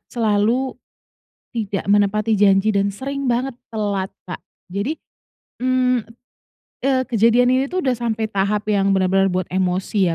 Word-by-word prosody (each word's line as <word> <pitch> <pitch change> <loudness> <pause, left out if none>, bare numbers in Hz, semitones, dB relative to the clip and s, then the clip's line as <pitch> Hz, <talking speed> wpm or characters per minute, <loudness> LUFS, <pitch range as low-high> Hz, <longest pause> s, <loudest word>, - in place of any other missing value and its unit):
selalu 230 +3 +1 0.8
tidak 205 -4 -3
menepati 205 +1 +2
janji 200 +1 +4
dan 200 -1 +1
sering 275 +7 -4
banget 250 +2 0 0.2
telat, 205 -4 -2 0.2
Kak. 180 - -7 0.3
Jadi, 205 +11 -2 0.7
mmm, 255 -1 +2 0.8
eee, 265 0 +1
kejadian 235 +2 +4
ini 260 +1 +2
tuh 365 +5 -2
udah 255 -5 0
sampai 225 -2 -2
tahap 205 +1 -1
yang 195 -1 +2
benar-benar 190 0 +2
buat 185 -1 -2
emosi 185 0 0
215 Hz, 130 wpm, -20 LUFS, 195-250 Hz, 0.8 s, janji